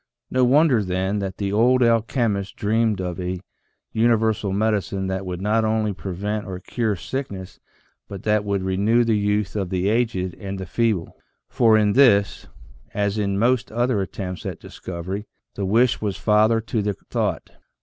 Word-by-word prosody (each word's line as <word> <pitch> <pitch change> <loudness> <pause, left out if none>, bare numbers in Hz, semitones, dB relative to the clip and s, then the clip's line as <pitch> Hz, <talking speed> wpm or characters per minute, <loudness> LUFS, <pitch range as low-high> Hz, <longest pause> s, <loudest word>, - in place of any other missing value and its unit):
No 130 0 +2
wonder 130 -2 +4
then 95 +2 -1
that 95 -2 -4
the 100 -1 -2
old 125 +4 +4
alchemists 115 -4 +1
dreamed 110 -1 +1
of 90 -2 -4
a 90 0 -3 0.5
universal 110 -3 +2
medicine 100 -2 0
that 95 0 -3
would 90 0 -4
not 110 +2 +2
only 110 -1 0
prevent 100 +2 -4
or 95 -1 -5
cure 110 +1 -1
sickness 100 -3 -6 0.5
but 100 -2 -8
that 105 -1 +2
would 100 -2 -1
renew 100 +6 +2
the 115 -1 +2
youth 105 0 0
of 95 -4 -2
the 95 +1 0
aged 110 -6 0
and 100 -1 -5
the 95 - -5
feeble, 105 -1 -1 0.3
for 115 -2 +4
in 105 -1 +3
this, 100 -6 +4 0.5
as 100 +1 0
in 100 -1 0
most 120 +2 +1
other 120 -2 +1
attempts 90 -1 -5
at - - -5
discov 85 -1 -8
ery, 100 +3 -4 0.3
the 100 - -3
wish 120 +5 +3
was 100 -3 -2
father 110 +1 +3
to 110 0 -2
the 105 0 -1 0.2
thought. - - -1
105 Hz, 170 wpm, -22 LUFS, 95-115 Hz, 0.5 s, wonder